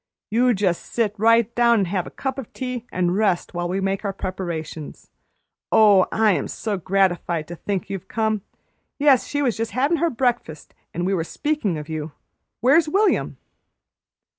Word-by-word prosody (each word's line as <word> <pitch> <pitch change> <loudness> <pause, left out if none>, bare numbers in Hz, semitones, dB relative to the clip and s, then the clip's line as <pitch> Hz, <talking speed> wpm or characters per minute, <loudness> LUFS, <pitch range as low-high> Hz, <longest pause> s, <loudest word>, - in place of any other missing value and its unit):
"You 245 +2 +3
just 190 -3 0
sit 225 -4 0
right 230 +1 +4
down 235 -2 +4
an' - - +1
have 180 0 -2
a - - -6
cup 265 0 -4
of 250 - -8
tea 250 -2 -5
and 180 0 0
rest 200 -4 +1
you - - -14
while 175 0 -2
we 190 +2 -1
make 195 +1 -1
our 200 - -1
preparations. 170 -5 -6 0.6
Oh, 205 -4 +6
I 220 -1 +3
am - - -1
so 215 -2 -3
gratified 180 -3 0
to 175 - -6
think 195 +1 -3
you've 195 -2 -6
come! 220 -2 -1 0.6
Yes, 280 -3 +4
she 290 0 -1
was 245 -5 +1
just 225 0 -3
havin' 280 +7 +2
her 340 +2 +1
breakfast, 240 - -2 0.2
and 175 +1 -3
we 195 - +1
were 170 -4 0
speakin' 290 - -2
of 150 0 -7
you. 155 -1 -5 0.5
Where's 295 +6 +4
William?" 405 +5 +1
205 Hz, 180 wpm, -22 LUFS, 180-240 Hz, 0.6 s, Oh